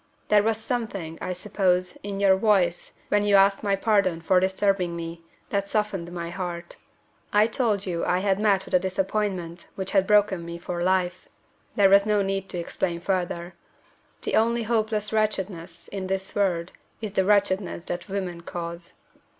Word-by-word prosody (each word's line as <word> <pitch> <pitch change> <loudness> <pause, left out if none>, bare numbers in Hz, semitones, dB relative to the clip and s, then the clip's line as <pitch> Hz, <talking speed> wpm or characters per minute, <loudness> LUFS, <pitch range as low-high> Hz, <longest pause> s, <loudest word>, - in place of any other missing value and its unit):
"There 210 -1 +6
was 220 +1 +1
something, 215 -8 -4
I 185 - -2
suppose, 185 -1 0
in 200 -1 -5
your 195 -1 +5
voice 190 -4 +1 0.2
when 205 - +3
you 205 -1 +4
asked 195 0 +5
my 200 -2 +1
pardon 195 -4 +2
for 180 +3 +3
disturbing 190 -2 +1
me, 165 0 -6 0.3
that 200 -1 0
softened 200 -5 -1
my 170 -1 -5
heart. 175 -2 -5 0.6
I 210 +1 +5
told 220 -3 0
you 170 -3 -2
I 180 - +2
had 195 +1 +1
met 200 -3 +2
with - - -11
a 180 - +6
disappointment 190 -2 -2
which 190 -1 -4
had 195 -1 +3
broken 205 -4 +3
me 170 0 -6
for 175 0 -5
life. 180 0 0 0.5
There 200 -2 +6
was 200 +1 +6
no 210 -1 +3
need 195 0 -2
to - - -4
explain 170 0 -2
further. 175 -1 -2 0.7
The - - -1
only 235 +1 +2
hopeless 220 -1 0
wretchedness 185 -6 -2
in 195 -2 -4
this 190 0 -2
world 180 -4 0 0.3
is 215 -3 -5
the 190 - +2
wretchedness 195 -3 +1
that 175 +3 -5
women 185 -3 -3
cause." 170 +1 -7
190 Hz, 170 wpm, -25 LUFS, 175-205 Hz, 0.7 s, There